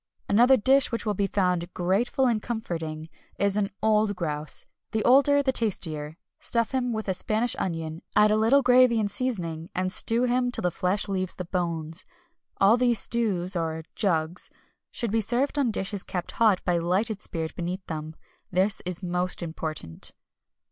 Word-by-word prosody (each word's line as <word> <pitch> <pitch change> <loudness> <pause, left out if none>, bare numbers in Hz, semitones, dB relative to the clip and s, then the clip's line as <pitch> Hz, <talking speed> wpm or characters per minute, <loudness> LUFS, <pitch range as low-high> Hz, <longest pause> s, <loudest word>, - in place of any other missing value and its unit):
Another 245 +6 +5
dish 265 +5 +3
which 230 - -3
will 210 - 0
be 200 0 0
found 180 -3 0
"grateful 205 +9 +1
and 230 -4 +1
comforting" 165 -9 -5 0.3
is 200 -1 +2
an 205 -1 +1
old 215 -1 +2
grouse 155 -3 +3 0.3
the 220 -1 0
older 280 +3 +5
the 265 - +2
tastier. 160 -10 -2 0.2
Stuff 230 -1 +1
him 250 -2 -1
with 220 -2 -4
a 190 - +1
Spanish 220 +6 0
onion, 165 -2 -4
add 210 0 +5
a - - +3
little 230 +6 +4
gravy 250 -2 +5
and 205 -2 -1
seasoning, 175 -10 -3
and 185 0 -1
stew 230 +5 +3
him 245 0 +1
till - - -1
the 180 - +1
flesh 185 +4 -1
leaves 185 -2 -2
the 180 - -6
bones. 165 -3 -1 0.6
All 205 +4 +5
these 245 -2 +2
stews, 200 -7 0
or 160 -1 -2
"jugs" 170 -3 0 0.4
should 235 -4 -2
be 225 +1 +2
served 250 +7 0
on 265 -4 +2
dishes 200 -2 -2
kept 180 -2 -5
hot 215 -5 +2
by 175 -1 +1
lighted 195 +5 -1
spirit 160 -1 -5
beneath 180 +2 -4
them. 155 -1 -6 0.3
This 190 +3 +1
is 180 +1 -3
most 180 0 -1
important. 155 - -6
195 Hz, 170 wpm, -26 LUFS, 175-230 Hz, 0.6 s, Another